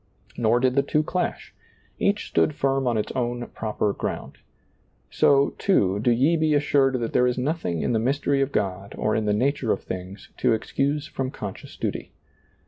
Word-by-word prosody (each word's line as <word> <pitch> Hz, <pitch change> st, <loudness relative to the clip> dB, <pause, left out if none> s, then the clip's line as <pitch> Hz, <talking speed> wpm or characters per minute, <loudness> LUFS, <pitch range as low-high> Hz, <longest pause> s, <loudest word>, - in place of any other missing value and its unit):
Nor 120 Hz, 0 st, +2 dB
did 130 Hz, 0 st, +2 dB
the 140 Hz, -, +4 dB
two 150 Hz, +2 st, +1 dB
clash. 180 Hz, +3 st, -3 dB, 0.5 s
Each 200 Hz, +1 st, +1 dB
stood 150 Hz, -, +2 dB
firm 135 Hz, -2 st, 0 dB
on 120 Hz, -2 st, +1 dB
its 105 Hz, -, -2 dB
own 120 Hz, -1 st, -2 dB
proper 105 Hz, -2 st, -1 dB
ground. -, -, -5 dB, 0.7 s
So, 140 Hz, 0 st, +3 dB
too, 100 Hz, -, +2 dB
do 115 Hz, -, +1 dB
ye 135 Hz, +8 st, +3 dB
be 155 Hz, -1 st, +2 dB
assured 140 Hz, -2 st, +3 dB
that 115 Hz, -1 st, -3 dB
there 125 Hz, -, +4 dB
is 125 Hz, -, 0 dB
nothing 125 Hz, -, -1 dB
in -, -, 0 dB
the 110 Hz, -, +2 dB
mystery 140 Hz, +3 st, +1 dB
of 135 Hz, 0 st, 0 dB
God 100 Hz, -3 st, -2 dB
or 110 Hz, 0 st, 0 dB
in 110 Hz, -, 0 dB
the 105 Hz, -, +2 dB
nature 125 Hz, +1 st, +1 dB
of -, -, -1 dB
things 95 Hz, +2 st, -7 dB
to -, -, +2 dB
excuse 140 Hz, +6 st, -1 dB
from 135 Hz, -5 st, -3 dB
conscious -, -, -8 dB
duty. -, -, -4 dB
125 Hz, 185 wpm, -24 LUFS, 110-140 Hz, 0.7 s, the